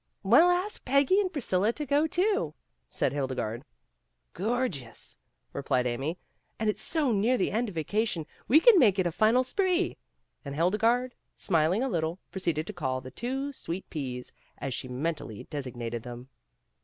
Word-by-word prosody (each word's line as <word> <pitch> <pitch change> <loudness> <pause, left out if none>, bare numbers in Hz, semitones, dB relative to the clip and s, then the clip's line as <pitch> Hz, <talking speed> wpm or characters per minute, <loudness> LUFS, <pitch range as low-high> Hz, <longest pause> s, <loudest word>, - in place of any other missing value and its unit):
"We'll 245 - +6
ask 360 +4 0
Peggy 280 +9 +4
and 375 -3 -2
Priscilla 215 - +1
to 300 - -4
go, 290 +3 +2
too," 400 +5 +1 0.3
said - - 0
Hildegarde. 130 -5 -2 0.7
"Gorgeous," 195 - -3 0.3
replied 125 -1 0
Amy, 135 +8 -2 0.4
"and 220 -1 +1
it's - - -6
so 300 -6 +2
near 225 +4 +2
the 190 - 0
end 230 +2 0
of 190 - -10
vacation 175 +1 -1 0.2
we 300 - +7
can 435 +1 +7
make 205 - +5
it 185 - +2
a 175 - +1
final 220 +8 +3
spree"; 370 +6 +1 0.5
and 140 -1 -6
Hildegarde, 225 - +2 0.2
smiling 175 +5 +2
a - - +1
little, 165 -6 -1
proceeded 170 -5 -1
to 210 - -6
call 130 -8 -2
the 130 0 -10
two 265 - -3
Sweet 185 -6 -5
P's 125 -5 -5 0.2
as 135 - -4
she 130 - -4
mentally 130 -4 -4
designated 120 -5 -4
them. 120 +2 -9
190 Hz, 160 wpm, -28 LUFS, -, 0.7 s, we